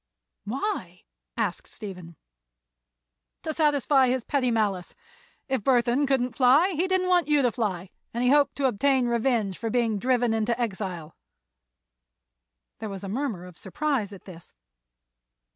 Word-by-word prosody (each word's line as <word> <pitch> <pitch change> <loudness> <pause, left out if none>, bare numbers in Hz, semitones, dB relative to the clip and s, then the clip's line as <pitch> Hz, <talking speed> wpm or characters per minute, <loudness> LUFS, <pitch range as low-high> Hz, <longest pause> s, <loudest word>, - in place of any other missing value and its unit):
"Why?" 210 - -4 0.3
asked 210 -6 -2
Stephen. 180 -5 -9 1.3
"To 315 - -2
satisfy 285 -3 +3
his 255 -1 0
petty 265 -2 0
malice. 205 -6 -1 0.5
If 260 -5 -1
Burthon 250 +2 +2
couldn't 255 -3 0
fly 270 +9 +5
he 350 +2 0
didn't 375 -1 +1
want 355 -3 +3
you 295 -2 +3
to 245 - +3
fly, 190 -6 -3 0.2
and 235 +1 -2
he 250 - +4
hoped 290 0 +3
to 280 - -1
obtain 260 +2 +2
revenge 235 -5 0
for 225 - -2
being 225 -3 +1
driven 245 0 +1
into 225 +2 0
exile." 190 -8 -4 1.6
There 220 - -5
was 195 -1 -7
a 195 - -5
murmur 220 -6 -3
of 180 -2 -13
surprise 285 -9 -2
at 195 - -12
this. 170 - -13
240 Hz, 145 wpm, -26 LUFS, 200-275 Hz, 1.6 s, fly